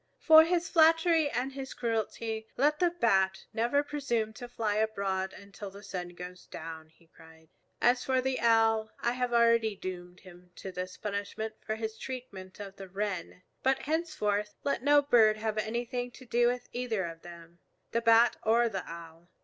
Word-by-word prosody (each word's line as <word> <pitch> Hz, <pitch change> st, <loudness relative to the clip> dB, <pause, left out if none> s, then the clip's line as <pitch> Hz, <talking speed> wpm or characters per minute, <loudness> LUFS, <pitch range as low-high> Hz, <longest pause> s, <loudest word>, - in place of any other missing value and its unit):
"For 315 Hz, 0 st, +8 dB
his 345 Hz, 0 st, 0 dB
flattery 325 Hz, -1 st, +4 dB
and 260 Hz, 0 st, -2 dB
his 270 Hz, -1 st, -7 dB
cruelty 225 Hz, -1 st, -2 dB
let 300 Hz, +3 st, +2 dB
the 355 Hz, -, +4 dB
Bat 195 Hz, -, +1 dB
never 240 Hz, +6 st, +1 dB
presume 250 Hz, -7 st, -2 dB
to 245 Hz, -, -8 dB
fly 220 Hz, -3 st, -2 dB
abroad 195 Hz, -3 st, -1 dB
until 200 Hz, 0 st, -10 dB
the 200 Hz, +1 st, -13 dB
sun 180 Hz, -3 st, -6 dB
goes 180 Hz, +1 st, -9 dB
down," 160 Hz, -1 st, -8 dB
he 165 Hz, +1 st, -26 dB
cried. 160 Hz, -1 st, -19 dB, 0.3 s
"As 245 Hz, +1 st, +3 dB
for 260 Hz, -1 st, +1 dB
the 260 Hz, 0 st, -1 dB
Owl, 225 Hz, -1 st, +3 dB
I 235 Hz, -, 0 dB
have 250 Hz, 0 st, -2 dB
already 230 Hz, -2 st, +3 dB
doomed 180 Hz, -1 st, -7 dB
him 180 Hz, -1 st, -15 dB
to 190 Hz, -, -7 dB
this 185 Hz, 0 st, -6 dB
punishment 210 Hz, +1 st, -4 dB
for 220 Hz, -, -2 dB
his 220 Hz, 0 st, -5 dB
treatment 205 Hz, -8 st, -8 dB
of 195 Hz, -1 st, -8 dB
the 195 Hz, -, -8 dB
Wren. 190 Hz, -2 st, -4 dB, 0.2 s
But 265 Hz, 0 st, +1 dB
henceforth 240 Hz, -11 st, -1 dB
let 280 Hz, -, 0 dB
no 290 Hz, +2 st, +5 dB
bird 225 Hz, -6 st, +5 dB
have 215 Hz, 0 st, -2 dB
anything 240 Hz, +3 st, -3 dB
to 260 Hz, -, -13 dB
do 240 Hz, 0 st, +2 dB
with 245 Hz, 0 st, -2 dB
either 230 Hz, -6 st, -1 dB
of 165 Hz, -1 st, -8 dB
them, 170 Hz, 0 st, -13 dB, 0.3 s
the 230 Hz, -, 0 dB
Bat 230 Hz, +1 st, +5 dB
or 230 Hz, +2 st, +3 dB
the 190 Hz, -5 st, -4 dB
Owl. 170 Hz, 0 st, -11 dB
220 Hz, 175 wpm, -30 LUFS, 190-250 Hz, 0.3 s, For